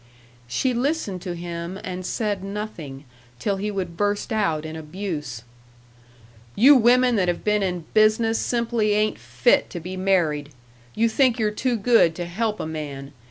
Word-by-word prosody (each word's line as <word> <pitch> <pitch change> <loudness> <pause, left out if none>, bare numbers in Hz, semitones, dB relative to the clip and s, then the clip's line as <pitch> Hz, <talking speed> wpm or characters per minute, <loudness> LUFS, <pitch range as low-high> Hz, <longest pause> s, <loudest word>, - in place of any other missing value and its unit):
She 250 - 0
listened 245 - -1
to 180 -2 -5
him 170 +2 -6
and 185 0 -5
said 205 0 -2
nothing, 195 -9 -6 0.3
till 195 - -1
he 205 +2 -2
would 185 -4 -4
burst 205 +2 -1
out 165 -8 0
in 155 0 -6
abuse: 150 - -5 1.1
"You 270 +7 +7
women 245 0 +4
that 185 -2 +2
have 175 - -1
been 210 0 +2
in 180 -4 -2
business 220 +1 +3
simply 235 -3 0
ain't 215 +1 +1
fit 125 0 +2
to 175 - -6
be 180 +3 -6
married. 170 -7 +1 0.5
You 230 +1 +3
think 245 +1 +2
you're 215 -2 +1
too 245 +2 -1
good 220 -7 +4
to 175 - -4
help 215 +5 -2
a - - -3
man. 145 -3 -6
195 Hz, 160 wpm, -23 LUFS, 170-220 Hz, 1.1 s, You